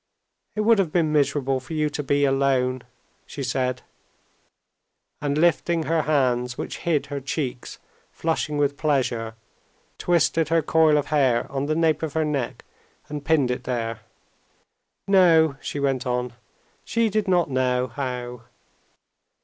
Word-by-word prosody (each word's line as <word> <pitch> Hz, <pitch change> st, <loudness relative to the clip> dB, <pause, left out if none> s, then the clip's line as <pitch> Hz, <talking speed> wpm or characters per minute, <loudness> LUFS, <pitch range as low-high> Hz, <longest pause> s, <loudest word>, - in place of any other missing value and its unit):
"It 215 Hz, -, 0 dB
would 225 Hz, 0 st, +4 dB
have 180 Hz, -5 st, +1 dB
been 160 Hz, -3 st, +1 dB
miserable 140 Hz, -2 st, +1 dB
for 130 Hz, +5 st, -9 dB
you 155 Hz, -1 st, +1 dB
to 150 Hz, -, -3 dB
be 145 Hz, 0 st, +1 dB
alone," 135 Hz, -2 st, +1 dB, 0.5 s
she 140 Hz, -, -6 dB
said, 125 Hz, 0 st, -1 dB, 1.4 s
and 145 Hz, 0 st, -1 dB
lifting 170 Hz, 0 st, +2 dB
her 165 Hz, 0 st, +1 dB
hands 125 Hz, -5 st, 0 dB
which -, -, -5 dB
hid 160 Hz, -4 st, 0 dB
her 140 Hz, -1 st, -5 dB
cheeks 135 Hz, -2 st, -4 dB, 0.3 s
flushing 160 Hz, -2 st, -2 dB
with 145 Hz, -1 st, +1 dB
pleasure, 120 Hz, -7 st, -1 dB, 0.6 s
twisted 165 Hz, -2 st, +2 dB
her 165 Hz, -1 st, +2 dB
coil 155 Hz, 0 st, +4 dB
of 145 Hz, -, -2 dB
hair 130 Hz, -5 st, +3 dB
on 140 Hz, +1 st, -2 dB
the 155 Hz, -, 0 dB
nape 160 Hz, -1 st, +2 dB
of 160 Hz, -3 st, -3 dB
her 160 Hz, -1 st, +1 dB
neck 140 Hz, -5 st, -3 dB, 0.4 s
and 150 Hz, -1 st, -5 dB
pinned 145 Hz, -5 st, +2 dB
it 125 Hz, -, -4 dB
there. 115 Hz, -2 st, -3 dB, 1.1 s
"No," 165 Hz, -6 st, +5 dB
she 145 Hz, -, -4 dB
went 135 Hz, -3 st, -1 dB
on, 125 Hz, 0 st, -2 dB, 0.5 s
"she 230 Hz, 0 st, +1 dB
did 215 Hz, -1 st, -1 dB
not 175 Hz, -5 st, +2 dB
know 125 Hz, -1 st, +1 dB
how.... 125 Hz, -1 st, -5 dB
145 Hz, 145 wpm, -24 LUFS, 130-160 Hz, 1.4 s, No